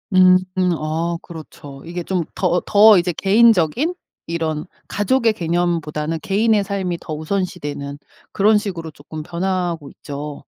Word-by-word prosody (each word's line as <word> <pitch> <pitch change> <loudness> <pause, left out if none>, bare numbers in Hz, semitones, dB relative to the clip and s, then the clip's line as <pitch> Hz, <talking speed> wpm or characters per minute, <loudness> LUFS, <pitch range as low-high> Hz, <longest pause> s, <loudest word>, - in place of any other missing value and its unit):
음음. 185 0 +4
어 165 +3 -2
그렇죠. 145 -4 -11
이게 175 +1 -5
좀 180 -1 -1
더 180 -1 +1
더 210 0 +7
이제 180 0 +1
개인적인 220 - +3 0.3
이런 160 -2 -2 0.2
가족의 225 +2 +1
개념보다는 165 -3 -1
개인의 210 +1 +2
삶이 190 -3 -2
더 155 - -6
우선시되는 155 -4 -3 0.3
그런 210 +1 +4
식으로 180 -6 -4
쪼끔 150 +1 -9
변하고 175 -3 -2
있죠. 145 0 -7
175 Hz, 285 characters per minute, -20 LUFS, 155-195 Hz, 0.3 s, 더